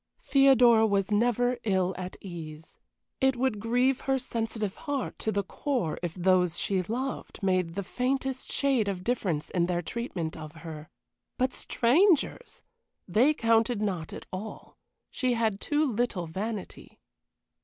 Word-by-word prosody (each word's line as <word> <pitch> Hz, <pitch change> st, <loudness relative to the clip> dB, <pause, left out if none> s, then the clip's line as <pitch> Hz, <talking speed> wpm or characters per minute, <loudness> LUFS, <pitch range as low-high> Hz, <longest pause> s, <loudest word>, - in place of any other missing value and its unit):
Theodora 245 Hz, -, +6 dB
was 200 Hz, 0 st, 0 dB
never 245 Hz, +3 st, +2 dB
ill 190 Hz, -3 st, +1 dB
at 185 Hz, 0 st, -6 dB
ease. 160 Hz, -4 st, -9 dB, 0.4 s
It 265 Hz, 0 st, +3 dB
would 245 Hz, -4 st, 0 dB
grieve 245 Hz, +4 st, +2 dB
her 270 Hz, 0 st, +1 dB
sensitive 225 Hz, -5 st, -3 dB
heart 285 Hz, -3 st, -4 dB
to 220 Hz, -, -1 dB
the 200 Hz, -1 st, 0 dB
core 235 Hz, -, -2 dB
if 175 Hz, -2 st, -4 dB
those 180 Hz, -2 st, +2 dB
she 190 Hz, -2 st, +1 dB
loved 240 Hz, +3 st, -4 dB
made 185 Hz, -3 st, +1 dB
the 200 Hz, -, -2 dB
faintest 260 Hz, +4 st, -2 dB
shade 265 Hz, -7 st, +2 dB
of 185 Hz, -2 st, -3 dB
difference 185 Hz, -11 st, -1 dB
in 175 Hz, -1 st, +1 dB
their 175 Hz, -1 st, -1 dB
treatment 180 Hz, -7 st, -4 dB
of 155 Hz, -1 st, -8 dB
her 155 Hz, -2 st, -8 dB, 0.5 s
but 255 Hz, 0 st, +1 dB
strangers! 335 Hz, -, +2 dB, 0.4 s
They 245 Hz, -, +4 dB
counted 230 Hz, -2 st, +2 dB
not 185 Hz, -7 st, -2 dB
at -, -, -8 dB
all, 205 Hz, +4 st, -7 dB, 0.4 s
she 255 Hz, -2 st, 0 dB
had 220 Hz, -3 st, 0 dB
too 300 Hz, +1 st, +1 dB
little 235 Hz, -, -1 dB
vanity. 200 Hz, +5 st, -6 dB
220 Hz, 145 wpm, -28 LUFS, 185-250 Hz, 0.5 s, Theodora